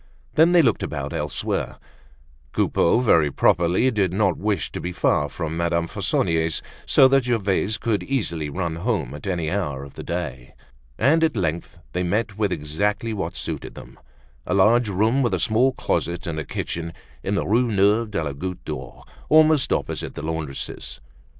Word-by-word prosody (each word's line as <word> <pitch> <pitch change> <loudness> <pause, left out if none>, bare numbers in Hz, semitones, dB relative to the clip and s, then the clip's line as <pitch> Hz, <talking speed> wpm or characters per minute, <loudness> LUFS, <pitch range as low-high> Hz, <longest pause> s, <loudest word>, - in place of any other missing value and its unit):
Then, 165 +3 +5
they 175 -2 +6
looked 125 - +2
about - - -4
elsewhere. - - -2 0.8
Coupeau, 100 +8 +2
very 80 -11 +4
properly 90 - +3
did 100 -6 +1
not 95 -2 +2
wish 105 0 -1
to - - -5
be 90 - -3
far 75 -4 +1
from 80 -1 -4
Madame 85 0 0
Fauconnier's 80 0 0 0.2
so 135 - +6
that 135 -1 +3
Gervaise 105 -3 0
could 105 -2 -1
easily 85 - -2
run 85 +1 -3
home 95 - -1
at 75 +6 -8
any 85 -4 -1
hour 75 -9 -2
of 70 - -11
the - - -8
day. 65 -8 -5 0.4
And 155 +7 +3
at 155 -7 +1
length 85 -2 -2 0.2
they 90 - -1
met 105 +4 -1
with 105 -2 0
exactly 100 +8 -1
what 100 -2 -4
suited - - -5
them, - - -12 0.5
a 90 - +1
large 110 +4 +4
room 110 +7 +2
with 120 - +1
a - - -3
small 120 +5 +3
closet 85 -8 -2
and 80 -3 -3
a 75 - -4
kitchen, 85 0 -4 0.3
in 100 - -1
the - - 0
Rue 115 +3 +2
Neuve 105 +3 +3
de 90 -6 -2
la 70 -2 -3
Goutte 90 +6 -6
d'Or, 65 -5 -7 0.3
almost 155 -2 +5
opposite - - -2
the 75 - -6
laundress's. 80 -5 -5
95 Hz, 175 wpm, -23 LUFS, 80-115 Hz, 0.8 s, they